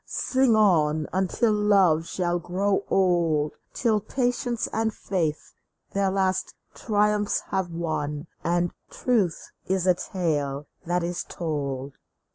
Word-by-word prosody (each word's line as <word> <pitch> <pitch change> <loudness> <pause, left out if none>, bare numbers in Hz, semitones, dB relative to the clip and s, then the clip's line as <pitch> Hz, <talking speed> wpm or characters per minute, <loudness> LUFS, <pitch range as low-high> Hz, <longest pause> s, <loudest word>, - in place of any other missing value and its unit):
Sing 260 -3 +2
on 155 -7 +3
until 195 +4 +1
love 195 -6 +3
shall 175 -1 -1
grow 195 +3 0
old; 170 -5 +2 0.2
Till 225 -4 +1
patience 245 +1 -1
and 220 0 +1
faith 165 -7 -2 0.4
their 195 -1 +1
last 190 -1 0 0.2
triumphs 210 -1 +1
have 190 -2 0
won, 155 -3 -3 0.2
And 175 0 +1 0.2
truth 215 -9 0 0.2
is 190 -1 +1
a 185 - +6
tale 150 -6 -2 0.2
that 175 0 +1
is 175 +1 -2
told 140 -5 -4
180 Hz, 115 wpm, -25 LUFS, 160-205 Hz, 0.4 s, a